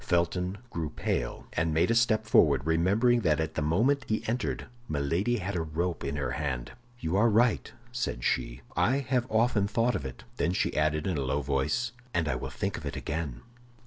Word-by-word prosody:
Felton 90 +2 0
grew 80 -2 -2
pale, - - -2
and 80 -1 0
made 80 +8 +3
a - - +4
step 115 -2 +3
forward, 70 -10 +4
remembering 100 +10 +3
that 80 -5 +2
at 80 -1 -1
the - - -2
moment 115 - +2
he 110 - -1
entered 120 +3 -1 0.2
Milady 85 +11 0
had 100 -1 -3
a 85 - 0
rope 80 +2 -2
in 70 +1 -2
her 70 -2 -2
hand. 70 -4 -3 0.3
"You 80 -1 -1
are 115 +3 +5
right," 115 +1 +2 0.2
said 120 - -3
she, - - -1
"I 130 +3 +3
have 130 -2 0
often 110 -2 +2
thought 115 +4 +1
of - - -2
it." 65 -2 -7
Then 85 - +1
she - - 0
added 75 0 +1
in 90 -6 0
a - - 0
low 70 +2 -1
voice, 70 - 0 0.2
"And 80 -2 +1
I 75 - +1
will 65 - -4
think - - -3
of - - -10
it - - -4
again." 75 -6 -4
85 Hz, 205 wpm, -29 LUFS, 75-110 Hz, 0.3 s, are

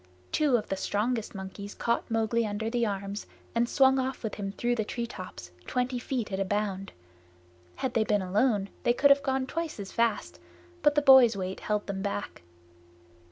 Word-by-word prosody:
Two 290 -5 +3
of 215 - -5
the 195 - 0
strongest 215 +3 -1
monkeys 195 +1 -7
caught 235 - -1
Mowgli 225 +1 +1
under 220 +1 -2
the 235 -1 +1
arms 200 0 -4 0.3
and 235 +1 +1
swung 265 -1 +4
off 260 0 -3
with 220 - -3
him 195 -1 -4
through 240 +4 -1
the 225 -2 0
treetops, 205 - -6 0.2
twenty 250 0 -1
feet 240 -4 -3
at 190 - -2
a - - +2
bound. 195 -1 -2 0.8
Had 255 - -2
they 225 -3 +3
been 210 -2 +1
alone 200 +1 +1
they 240 -2 +3
could 280 +3 +5
have 280 0 +6
gone 265 -1 0
twice 330 -1 -4
as 195 -1 -6
fast, 230 -2 0 0.4
but 295 -2 +4
the 295 - +3
boy's 260 -6 +8
weight 190 0 -4
held 210 -1 -1
them 195 -1 -4
back. 205 0 -4
225 Hz, 185 wpm, -28 LUFS, 200-250 Hz, 0.8 s, boy's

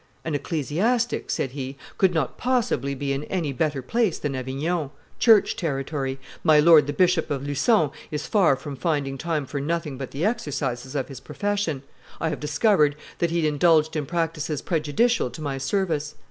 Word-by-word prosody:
"An 160 - -2
ecclesiastic," 170 - 0
said 135 - -1
he, 135 0 -6 0.2
"could 190 -2 +5
not 160 -6 -1
possibly 240 - 0
be 140 0 -2
in 135 +2 -3
any 165 -7 -2
better 145 0 -1
place 220 - +1
than 145 -2 -3
Avignon, 140 +5 -2 0.3
church 220 -4 +5
territory; 135 -3 -2 0.3
my 155 -3 +6
lord 155 -2 +7
the - - 0
Bishop 180 +1 +2
of 140 -1 -2
Lucon 145 - +2 0.2
is 150 -1 -4
far 185 -10 +4
from 140 +1 -7
finding 145 -3 -1
time 160 -3 -1
for 140 +1 -4
nothing 155 -2 -2
but 135 - -5
the 150 +6 -2
exercises 140 - -2
of 135 - -1
his 135 -3 -9
profession; 200 -6 -2 0.4
I 160 - 0
have - - -4
discovered 150 0 +3 0.2
that 170 - +2
he 170 -1 0
indulged 155 +1 +3
in 150 -3 -2
practices 160 -3 -2
prejudicial 165 - +1
to 125 - -10
my 140 -3 -3
service. 150 -1 -1
150 Hz, 175 wpm, -24 LUFS, 140-170 Hz, 0.4 s, lord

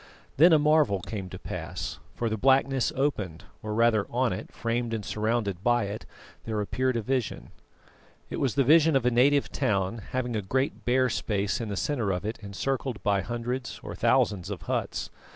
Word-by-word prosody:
Then 170 +5 +7
a 160 - +7
marvel 150 -9 +3
came 100 -3 -5
to - - -7
pass, 75 - -5 0.2
for 120 - -1
the 110 - 0
blackness 135 +2 +3
opened, 105 - -1 0.2
or 105 0 -4
rather 115 -3 +3
on 125 -2 +1
it, 95 - -7
framed 115 0 -2
and 105 - -5
surrounded 105 -4 -1
by 120 -1 +3
it, 100 +2 -5 0.4
there 110 -2 -2
appeared 130 +4 0
a 115 - -2
vision. 130 -1 -2 0.8
It - - -5
was 135 -4 0
the 140 - +4
vision 160 +2 +5
of 130 -3 +2
a 125 - +4
native 140 +4 +3
town, 105 -4 0
having 125 -2 -2
a 105 - 0
great 130 +8 -1
bare 130 +1 +3
space 105 +1 -1
in 115 - -4
the 100 - -3
centre 120 -6 -1
of 90 0 -2
it 110 +2 -3
encircled 120 +4 -3
by 100 -2 +2
hundreds 120 +4 -4
or - - -6
thousands 95 -3 +2
of 100 -5 -5
huts. - - -2
115 Hz, 190 wpm, -27 LUFS, 105-130 Hz, 0.8 s, Then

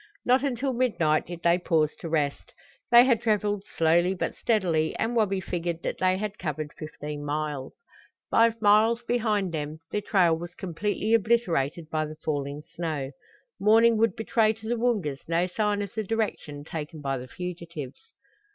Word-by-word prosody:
Not 255 +2 +4
until 265 -1 -1
midnight 190 -12 +1
did 175 0 -8
they 170 +1 +4
pause 155 -4 +1
to 165 - -6
rest. 150 -3 -1 0.4
They 240 0 +8
had 240 -4 +3
traveled 205 -3 0
slowly 170 +3 +3
but - - -2
steadily 170 -8 +1
and 230 +2 -1
Wabi 200 -4 +2
figured 170 -2 -3
that - - -3
they 185 0 +2
had 210 +1 -4
covered 155 -2 -4
fifteen 150 -1 -7
miles. 145 -2 -3 0.6
Five 230 0 +4
miles 220 +3 +4
behind 215 -6 0
them 155 -1 -4
their 210 - -1
trail 180 -5 +3
was 175 +2 -8
completely 205 +5 -2
obliterated 180 - +1
by 155 -1 0
the 155 - -8
falling 145 -1 -3
snow. 155 -5 -4 0.5
Morning 225 +3 +5
would 225 +1 +2
betray 220 -1 +2
to 220 0 -11
the 240 - +1
Woongas 210 - 0
no 170 +2 +2
sign 205 +2 0
of 200 - -8
the 220 - -2
direction 200 -9 -3
taken 155 +1 -6
by 135 -2 -2
the 125 - -8
fugitives. 170 -4 -7
180 Hz, 165 wpm, -27 LUFS, 155-220 Hz, 0.6 s, They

